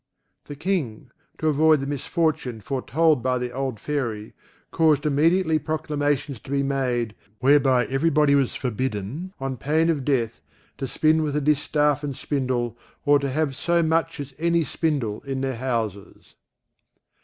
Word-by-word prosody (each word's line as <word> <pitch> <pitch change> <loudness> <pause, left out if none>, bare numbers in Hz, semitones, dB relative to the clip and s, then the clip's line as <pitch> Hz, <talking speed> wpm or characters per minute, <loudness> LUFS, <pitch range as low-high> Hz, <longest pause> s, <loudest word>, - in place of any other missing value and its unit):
The 145 - -8
King, 150 - -2 0.3
to 155 - -1
avoid 155 0 +4
the 135 - -3
misfortune 145 -2 -1
foretold 140 +6 +1
by 125 +1 +1
the 125 0 -3
old 130 -3 -3
Fairy, 115 -8 -3 0.4
caused 155 -3 +3
immediately 160 +3 +3
proclamations 145 -3 -2
to - - -15
be 140 0 +1
made, 125 -5 -1 0.2
whereby 130 -1 +4
every 135 +5 +1
body 150 -2 +3
was 140 -3 +2
forbidden, 130 - -3
on 135 -1 -3
pain 155 +7 +2
of 145 -5 -2
death, 120 - 0 0.4
to 135 - -2
spin 155 +4 +2
with 150 -2 -1
a 150 - +1
distaff 150 0 +1
and 140 -2 -3
spindle 125 -5 -2 0.3
or 145 0 +5
to 140 -1 -2
have 140 0 -1
so 170 +3 +1
much 165 0 0
as 140 -1 -6
any 170 0 +2
spindle 140 -10 -1
in 135 -1 -4
their 135 -2 -2
houses. 115 -6 -4
140 Hz, 155 wpm, -24 LUFS, 130-155 Hz, 0.4 s, or